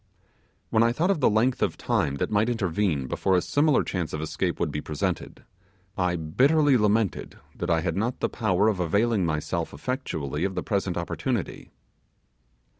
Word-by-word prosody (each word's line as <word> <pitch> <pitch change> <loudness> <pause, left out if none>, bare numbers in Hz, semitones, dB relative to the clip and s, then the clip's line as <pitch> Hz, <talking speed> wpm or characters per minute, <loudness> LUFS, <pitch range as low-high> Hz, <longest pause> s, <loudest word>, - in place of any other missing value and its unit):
When 110 - +3
I 115 +1 +3
thought 170 +9 +1
of 195 - 0
the - - +4
length 115 +4 +1
of - - 0
time 70 - 0
that 70 - -2
might 105 +3 +2
intervene 95 - 0
before 95 +8 0
a - - +4
similar 145 -1 +2
chance 90 -4 -3
of 75 - -2
escape 80 0 -2
would - - 0
be 75 - -3
presented, 75 -1 -3 0.5
I 90 -2 0
bitterly 135 - +3
lamented 105 -2 +1 0.2
that 85 - -4
I 85 -1 +2
had 85 -1 -2
not 115 +6 -1
the - - +1
power 105 -3 +1
of 105 -4 +1
availing 100 +2 +1
myself 80 +2 -2
effectually 75 - -3
of 95 -1 -1
the - - -2
present 100 -3 -1
opportunity. 105 +5 -3
100 Hz, 175 wpm, -26 LUFS, 85-115 Hz, 0.5 s, the